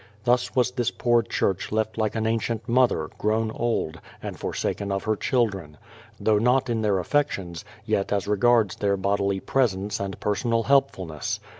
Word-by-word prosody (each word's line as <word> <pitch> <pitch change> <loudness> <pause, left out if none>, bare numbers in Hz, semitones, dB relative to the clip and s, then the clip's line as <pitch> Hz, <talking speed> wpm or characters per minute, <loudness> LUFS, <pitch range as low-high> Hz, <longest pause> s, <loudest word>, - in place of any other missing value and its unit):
Thus 120 +1 +1
was 125 -1 +3
this 125 -2 0
poor 120 -1 +2
church 95 -4 -1
left 110 0 -1
like 110 -1 -1
an 110 -1 -1
ancient 115 0 -1
mother, 120 -10 +2
grown 110 +1 +1
old, 110 -9 -2 0.2
and - - -6
forsaken 100 -1 -2
of 95 0 -1
her 110 0 +1
children, 100 - -1 0.2
— - - -24
though 110 -1 +3
not 125 +2 +2
in 115 -1 0
their 105 -3 +2
affections, 95 - -1 0.2
yet 105 -3 0
as 100 -1 0
regards 105 0 +3
their 100 -1 +1
bodily 100 0 0
presence 100 -5 0
and 100 -1 -4
personal 115 +3 0
helpfulness. 95 - 0
110 Hz, 165 wpm, -25 LUFS, 100-120 Hz, 0.2 s, was